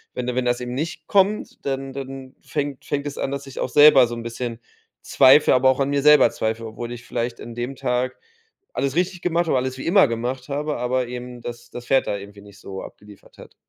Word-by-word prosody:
wenn 125 Hz, -, -3 dB
da 125 Hz, -, -2 dB
wenn 125 Hz, 0 st, -1 dB
das 120 Hz, 0 st, 0 dB
eben 125 Hz, 0 st, -5 dB
nicht 155 Hz, +3 st, -4 dB
kommt, 200 Hz, +3 st, +1 dB
dann 135 Hz, -1 st, -3 dB
dann 135 Hz, -1 st, -8 dB
fängt 145 Hz, -3 st, -4 dB
fängt 140 Hz, 0 st, -2 dB
es 145 Hz, -1 st, -5 dB
an, -, -, -1 dB
dass 140 Hz, 0 st, -5 dB
ich 135 Hz, -, -9 dB
auch -, -, -1 dB
selber 145 Hz, -4 st, +7 dB
so 120 Hz, -, -5 dB
'n 115 Hz, -, -7 dB
bisschen 115 Hz, 0 st, -5 dB, 0.4 s
zweifle, 135 Hz, +2 st, +5 dB
aber 130 Hz, +1 st, +4 dB
auch 130 Hz, -, +1 dB
an 135 Hz, 0 st, +1 dB
mir 140 Hz, 0 st, +1 dB
selber 150 Hz, -4 st, +7 dB
zweifle, 110 Hz, +1 st, -3 dB
obwohl 115 Hz, +2 st, -7 dB
ich 120 Hz, 0 st, -8 dB
vielleicht 120 Hz, 0 st, -3 dB
an 120 Hz, -, -8 dB
dem 120 Hz, +3 st, -4 dB
Tag 125 Hz, +1 st, -1 dB, 0.6 s
alles 135 Hz, 0 st, -1 dB
richtig 180 Hz, 0 st, 0 dB
gemacht 170 Hz, 0 st, +1 dB
habe, 155 Hz, -, +1 dB
alles 130 Hz, 0 st, -2 dB
wie 130 Hz, -, -7 dB
immer 190 Hz, -2 st, +5 dB
gemacht 125 Hz, +4 st, -4 dB
habe, 150 Hz, +2 st, -2 dB
aber 125 Hz, 0 st, -1 dB
eben 125 Hz, 0 st, -7 dB
das 120 Hz, 0 st, -8 dB
das 120 Hz, 0 st, -9 dB
Pferd 135 Hz, +2 st, +2 dB
da 100 Hz, -, -1 dB
irgendwie 100 Hz, +1 st, -11 dB
nicht 100 Hz, 0 st, -16 dB
so 95 Hz, -1 st, -7 dB
abgeliefert 105 Hz, -1 st, -14 dB
hat. -, -, -14 dB
130 Hz, 230 wpm, -22 LUFS, 120-140 Hz, 0.6 s, selber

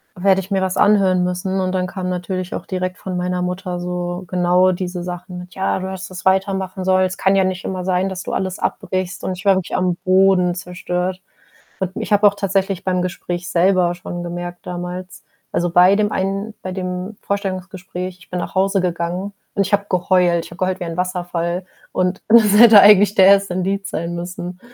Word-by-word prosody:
werde 190 Hz, +1 st, +3 dB
ich 190 Hz, -, -12 dB
mir 195 Hz, -1 st, +1 dB
was 185 Hz, -1 st, -1 dB
anhören 190 Hz, -3 st, +4 dB
müssen, 180 Hz, +1 st, -2 dB
und 185 Hz, -1 st, 0 dB
dann 185 Hz, -1 st, 0 dB
kam 185 Hz, -1 st, -4 dB
natürlich 180 Hz, 0 st, -3 dB
auch -, -, -6 dB
direkt 185 Hz, -1 st, -3 dB
von 185 Hz, -1 st, -5 dB
meiner 180 Hz, 0 st, -1 dB
Mutter 180 Hz, 0 st, -3 dB
so 175 Hz, +1 st, -4 dB
genau 180 Hz, +1 st, +3 dB
diese 180 Hz, -1 st, -4 dB
Sachen 180 Hz, 0 st, -7 dB
mit: 180 Hz, 0 st, -10 dB
„Ja, 190 Hz, 0 st, 0 dB
du 190 Hz, 0 st, -4 dB
hast 190 Hz, 0 st, -7 dB
das 185 Hz, 0 st, -9 dB
weitermachen 190 Hz, 0 st, 0 dB
sollen, 185 Hz, 0 st, +3 dB
es 185 Hz, -, -4 dB
kann 195 Hz, 0 st, +3 dB
ja 195 Hz, -, +4 dB
nicht 185 Hz, 0 st, -2 dB
immer 185 Hz, -1 st, -4 dB
sein, 185 Hz, +1 st, +1 dB
dass 185 Hz, -1 st, -6 dB
du -, -, -5 dB
alles 185 Hz, -1 st, -2 dB
abbrichst”, 185 Hz, 0 st, -3 dB
und 185 Hz, -, -2 dB
ich 185 Hz, -, -11 dB
war 195 Hz, -1 st, +5 dB
wirklich 185 Hz, -, -3 dB
am 180 Hz, -1 st, +1 dB
Boden 185 Hz, -2 st, +3 dB
zerstört. 180 Hz, 0 st, -3 dB, 0.6 s
Hat 190 Hz, 0 st, -3 dB
mi -, -, -4 dB
ich 210 Hz, -, -1 dB
habe 205 Hz, +1 st, +4 dB
auch 200 Hz, -, +3 dB
tatsächlich 195 Hz, -1 st, -1 dB
beim 180 Hz, -1 st, 0 dB
Gespräch 175 Hz, -1 st, -4 dB
selber 180 Hz, 0 st, +3 dB
schon 175 Hz, 0 st, -6 dB
gemerkt 175 Hz, 0 st, -6 dB
damals, 180 Hz, +1 st, -6 dB, 0.3 s
also 175 Hz, -, 0 dB
bei 180 Hz, +3 st, +6 dB
dem 210 Hz, 0 st, +1 dB
einen 195 Hz, +3 st, -2 dB
bei 185 Hz, -, -4 dB
dem 185 Hz, +2 st, -4 dB
Vorstellungsgespräch, 185 Hz, -2 st, -4 dB
ich 185 Hz, -, -19 dB
bin 180 Hz, -, -2 dB
nach 175 Hz, -, -6 dB
Hause 195 Hz, 0 st, +2 dB
gegangen, 180 Hz, +3 st, -2 dB, 0.2 s
und 200 Hz, -1 st, +1 dB
ich 205 Hz, -, -6 dB
habe 205 Hz, 0 st, +3 dB
geheult, 180 Hz, -1 st, +2 dB
ich -, -, -13 dB
habe 170 Hz, -, -11 dB
geheult 185 Hz, 0 st, -1 dB
wie 180 Hz, -, -4 dB
ein 165 Hz, 0 st, -6 dB
Wasserfall 175 Hz, -1 st, -2 dB, 0.3 s
und 185 Hz, +1 st, -1 dB
das 220 Hz, -2 st, +6 dB
hätte 225 Hz, -3 st, +10 dB
eigentlich 205 Hz, 0 st, +7 dB
der 190 Hz, -, +6 dB
1. 195 Hz, -2 st, +4 dB
Indiz 195 Hz, +2 st, -2 dB
sein 170 Hz, +1 st, -3 dB
müssen. 180 Hz, +1 st, -6 dB
185 Hz, 210 wpm, -19 LUFS, 180-190 Hz, 0.6 s, hätte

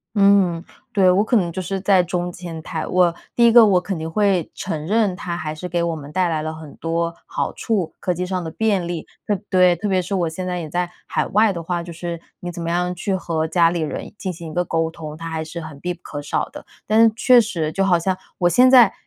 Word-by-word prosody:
嗯， 195 Hz, -4 st, +4 dB, 0.3 s
对， 190 Hz, -3 st, +4 dB
我 185 Hz, +3 st, +4 dB
可 240 Hz, +1 st, +2 dB
能 175 Hz, -4 st, +1 dB
就 185 Hz, +2 st, -4 dB
是 195 Hz, +2 st, -3 dB
在 190 Hz, -1 st, +4 dB
中 175 Hz, 0 st, -3 dB
间 170 Hz, -3 st, -7 dB
态。 160 Hz, -3 st, -4 dB
我 180 Hz, -2 st, +2 dB, 0.2 s
第 235 Hz, -1 st, +6 dB
一 230 Hz, -, +5 dB
个 235 Hz, -1 st, +9 dB
我 195 Hz, -4 st, +4 dB
肯 185 Hz, 0 st, -4 dB
定 160 Hz, 0 st, -5 dB
会 195 Hz, -3 st, +1 dB
承 160 Hz, -4 st, -4 dB
认 210 Hz, -2 st, +2 dB
它 175 Hz, -1 st, -4 dB
还 155 Hz, -2 st, -4 dB
是 180 Hz, +4 st, -6 dB
给 175 Hz, 0 st, -1 dB
我 165 Hz, -1 st, -1 dB
们 145 Hz, -2 st, -9 dB
带 180 Hz, +1 st, +1 dB
来 160 Hz, -2 st, -1 dB
了 155 Hz, 0 st, -3 dB
很 160 Hz, -2 st, -10 dB
多 170 Hz, 0 st, -2 dB
好 -, -, -2 dB
处， 200 Hz, -8 st, -2 dB
科 180 Hz, -, 0 dB
技 180 Hz, +1 st, -3 dB
上 185 Hz, -1 st, -2 dB
的 165 Hz, -, -5 dB
便 195 Hz, -1 st, 0 dB
利。 175 Hz, -2 st, -4 dB, 0.2 s
特 205 Hz, -, 0 dB
对， 180 Hz, -2 st, +4 dB
特 205 Hz, +5 st, -3 dB
别 190 Hz, -2 st, +2 dB
是 195 Hz, +3 st, -2 dB
我 175 Hz, -3 st, 0 dB
现 175 Hz, +3 st, -5 dB
在 180 Hz, -1 st, -2 dB
也 160 Hz, -3 st, -5 dB
在 175 Hz, +2 st, -2 dB, 0.2 s
海 -, -, 0 dB
外 215 Hz, +1 st, +3 dB
的 170 Hz, -2 st, -5 dB
话， 175 Hz, +1 st, -2 dB
就 170 Hz, -, -8 dB
是 170 Hz, 0 st, -5 dB, 0.2 s
你 175 Hz, -, -5 dB
怎 175 Hz, 0 st, -7 dB
么 170 Hz, -, -3 dB
样 180 Hz, +1 st, 0 dB
去 180 Hz, +2 st, -2 dB
和 165 Hz, -4 st, -1 dB
家 165 Hz, 0 st, +3 dB
里 170 Hz, -, -2 dB
人 155 Hz, -, -5 dB
进 185 Hz, -2 st, -3 dB
行 165 Hz, -1 st, -8 dB
一 -, -, -8 dB
个 180 Hz, -, +1 dB
沟 165 Hz, -1 st, 0 dB
通， 155 Hz, -2 st, -8 dB
它 165 Hz, +1 st, -6 dB
还 160 Hz, -1 st, -3 dB
是 170 Hz, +2 st, -7 dB
很 155 Hz, -3 st, -9 dB
必 180 Hz, +4 st, -3 dB
不 175 Hz, -, -22 dB
可 145 Hz, -, -6 dB
少 145 Hz, -, -1 dB
的。 -, -, -11 dB, 0.2 s
但 220 Hz, +2 st, +6 dB
是 225 Hz, -, +5 dB
确 245 Hz, +2 st, +6 dB
实 170 Hz, -9 st, -2 dB
就 195 Hz, +4 st, 0 dB
好 180 Hz, -3 st, +4 dB
像 185 Hz, +2 st, -1 dB, 0.2 s
我 175 Hz, -, +3 dB
现 250 Hz, +7 st, +5 dB
在 245 Hz, -6 st, +7 dB
175 Hz, 285 characters per minute, -21 LUFS, 165-195 Hz, 0.3 s, 个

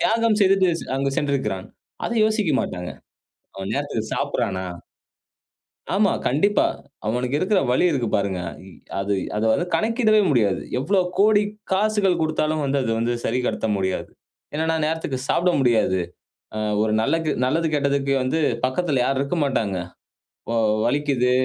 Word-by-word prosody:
தியாகம் 225 Hz, -1 st, +2 dB
செய்து 190 Hz, -3 st, +3 dB
அங்கு 135 Hz, 0 st, 0 dB
சென்றிருக்கிறான். 135 Hz, -9 st, -1 dB, 0.4 s
அத -, -, -2 dB
யோசிக்க 215 Hz, -4 st, +1 dB
மாட்டாங்க. 90 Hz, -1 st, -4 dB, 0.7 s
அவன் 95 Hz, +2 st, -5 dB
நேரத்துக்குச் 140 Hz, -6 st, -3 dB
சாப்பிட்றானா? 95 Hz, -1 st, -1 dB, 1.3 s
ஆமா. 200 Hz, 0 st, +3 dB
கண்டிப்பா. 180 Hz, +11 st, +3 dB, 0.4 s
அவனுக்கு 125 Hz, +4 st, 0 dB
இருக்குற 190 Hz, +3 st, +2 dB
வலி 125 Hz, -, +3 dB
இருக்கு 120 Hz, -5 st, -1 dB
பாருங்க. 100 Hz, -2 st, 0 dB, 0.3 s
இ -, -, -12 dB, 0.3 s
அது 100 Hz, +1 st, -1 dB, 0.2 s
அதை 105 Hz, -, 0 dB
வந்து 175 Hz, +9 st, 0 dB
கணக்கிடவே 220 Hz, -1 st, +3 dB
முடியாது. 105 Hz, -8 st, +2 dB, 0.2 s
எவ்வளவு 185 Hz, +8 st, +2 dB
கோடி 210 Hz, +1 st, +5 dB, 0.3 s
காசுகள் 195 Hz, -3 st, +2 dB
கொடுத்தாலும் 155 Hz, -1 st, 0 dB
வந்து 140 Hz, 0 st, +1 dB
அது 115 Hz, -, -1 dB
வந்து 115 Hz, +1 st, 0 dB
சரி 125 Hz, +3 st, 0 dB
கட்ட -, -, -1 dB
முடியாது. 95 Hz, -1 st, -2 dB, 0.5 s
என்னனா, 160 Hz, +1 st, 0 dB
நேரத்துக்கு 155 Hz, -4 st, -2 dB
சாப்பிட 180 Hz, +1 st, +2 dB
முடியாது. 110 Hz, -7 st, +2 dB, 0.6 s
அ, -, -, -3 dB, 0.3 s
ஒரு 110 Hz, -, 0 dB
நல்லகு 160 Hz, +6 st, 0 dB
நல்லது 160 Hz, +6 st, +1 dB
கெட்டதுக்கு 140 Hz, -1 st, +1 dB
வந்து 130 Hz, +5 st, 0 dB, 0.3 s
பக்கத்துல 135 Hz, 0 st, 0 dB
யாரும் 135 Hz, +1 st, 0 dB
இருக்க 140 Hz, +5 st, -2 dB
மாட்டாங்க. 110 Hz, -9 st, 0 dB, 0.7 s
ஓ, -, -, 0 dB, 0.3 s
வலிக்குது, 135 Hz, -2 st, +1 dB
140 Hz, 135 wpm, -23 LUFS, 120-180 Hz, 1.3 s, கோடி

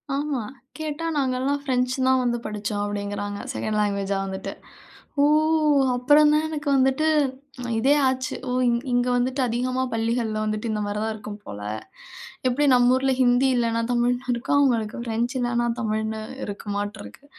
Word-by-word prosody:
ஆமா. 280 Hz, -5 st, -1 dB, 0.3 s
கேட்டா 315 Hz, +1 st, -4 dB
நாங்கள்லாம் 265 Hz, +1 st, 0 dB
ஃப்ரெஞ்ச் 250 Hz, -2 st, 0 dB
தான் 260 Hz, -1 st, +4 dB
வந்து 240 Hz, -1 st, 0 dB
படிச்சோம், 205 Hz, -1 st, -3 dB
அப்படிங்கிறாங்க. 205 Hz, 0 st, -4 dB
செகண்ட் 215 Hz, -1 st, -2 dB
லாங்குவேஜா 200 Hz, -1 st, 0 dB
வந்துட்டு. 190 Hz, 0 st, -5 dB, 0.7 s
ஓ! -, -, +5 dB, 0.7 s
அப்பறம் 295 Hz, +4 st, +5 dB
தான் 305 Hz, +1 st, +2 dB
எனக்கு 300 Hz, -1 st, -5 dB
வந்துட்டு 265 Hz, +4 st, +2 dB, 0.7 s
இதே 270 Hz, +5 st, +4 dB
ஆச்சு, 260 Hz, 0 st, -1 dB
ஓ! -, -, -1 dB, 0.2 s
இங் 235 Hz, 0 st, +2 dB
இங்க 245 Hz, 0 st, +2 dB
வந்துட்டு 260 Hz, +2 st, 0 dB
அதிகமா 255 Hz, +2 st, -1 dB
பள்ளிகள்ல 225 Hz, -1 st, -1 dB
வந்துட்டு, 215 Hz, +1 st, -2 dB
இந்த 210 Hz, -1 st, -1 dB
மாதிரி 205 Hz, +1 st, -3 dB
தான் 220 Hz, 0 st, -1 dB
இருக்கும் 210 Hz, -1 st, -8 dB
போல. 105 Hz, 0 st, -8 dB, 0.9 s
எப்படி 280 Hz, +4 st, +2 dB
நம்ம 245 Hz, 0 st, +5 dB
ஊருல 265 Hz, 0 st, +1 dB
ஹிந்தி 245 Hz, +2 st, +4 dB
இல்லைனா 230 Hz, -1 st, +1 dB
தமிழ்னு 245 Hz, +1 st, 0 dB
இருக்கும், 240 Hz, +4 st, 0 dB
அவங்களுக்கு 235 Hz, -6 st, +1 dB
ஃப்ரெஞ்ச் 235 Hz, +2 st, -1 dB
இல்லைனா 240 Hz, -1 st, 0 dB
தமிழ்ன்னு 220 Hz, -1 st, -2 dB, 0.2 s
இருக்குமாட்ருக்கு. 205 Hz, +5 st, -6 dB
240 Hz, 145 wpm, -24 LUFS, 215-260 Hz, 0.9 s, ஓ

